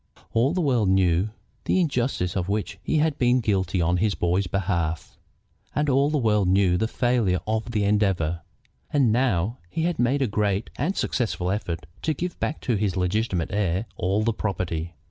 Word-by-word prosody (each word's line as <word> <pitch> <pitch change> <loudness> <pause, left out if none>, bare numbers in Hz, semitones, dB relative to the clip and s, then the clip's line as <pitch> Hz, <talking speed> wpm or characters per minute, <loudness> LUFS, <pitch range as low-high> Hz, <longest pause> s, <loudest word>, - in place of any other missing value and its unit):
All 120 +5 +3
the 185 - +1
world 125 - +2
knew 95 +1 +3 0.4
the - - +2
injustice 125 - 0
of 95 -1 -1
which 105 +1 -2
he - - 0
had 155 -1 +1
been 125 0 +4
guilty 95 -5 0
on 90 +2 +2
his 100 +2 +1
boy's 90 +2 0
behalf, 85 -4 -2 0.6
and 150 0 +1
all 140 +2 +3
the 150 - +1
world 105 -6 +2
knew 95 -1 +3
the 110 +5 +1
failure 120 -6 +1
of 110 +2 -1
the 110 -3 0
endeavor. 95 -6 +1 0.5
And 135 -6 +3
now 115 -2 +1
he 160 - -2
had 170 -1 -1
made 130 +3 +2
a - - +1
great 105 -1 -1
and 170 +9 -1
a - - -11
successful 95 -7 -1
effort 85 -6 -3 0.2
to 155 -1 0
give 175 +4 -4
back 155 - -2
to 120 -5 0
his 100 -2 -1
legitimate 90 -1 0
heir 100 0 0
all 100 +4 0
the 115 +1 +1
property. 85 -5 -3
105 Hz, 185 wpm, -25 LUFS, 90-125 Hz, 0.6 s, been